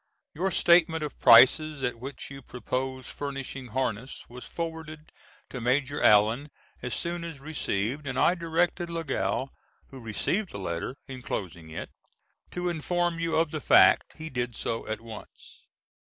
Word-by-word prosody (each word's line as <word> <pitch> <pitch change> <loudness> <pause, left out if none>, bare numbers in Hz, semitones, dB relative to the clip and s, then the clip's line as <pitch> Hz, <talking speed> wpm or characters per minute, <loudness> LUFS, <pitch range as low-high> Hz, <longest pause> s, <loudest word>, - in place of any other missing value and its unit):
Your 185 +5 0
statement 170 -3 +4
of 150 - -6
prices 135 +4 +7
at 125 -2 -1
which 135 +2 -7
you 135 0 -8
proposed 130 +2 -4
furnishing 135 -2 -5
harness 125 0 -3
was 125 +1 -10
forwarded 160 -2 -6 0.4
to 125 - -5
Maj. 130 +3 +1
Allen 115 +2 +4 0.3
as 125 -1 -2
soon 170 0 -3
as 165 -4 -7
received 140 -2 -2
and 130 0 -3
I 175 - +4
directed 170 0 0
Lagow, 155 -4 -2 0.4
who 135 - -10
received 150 - -2
the - - -5
letter 90 +5 -4
enclosing 95 - -5
it, 80 - -7 0.6
to 180 0 -3
inform 175 +1 -1
you 165 -1 0
of 160 -1 +2
the 155 - -4
fact. - - +5
He 160 0 -7
did 120 -2 -2
so 115 - -3
at 110 +1 -3
once. 115 -2 -12
135 Hz, 150 wpm, -28 LUFS, 125-160 Hz, 0.6 s, prices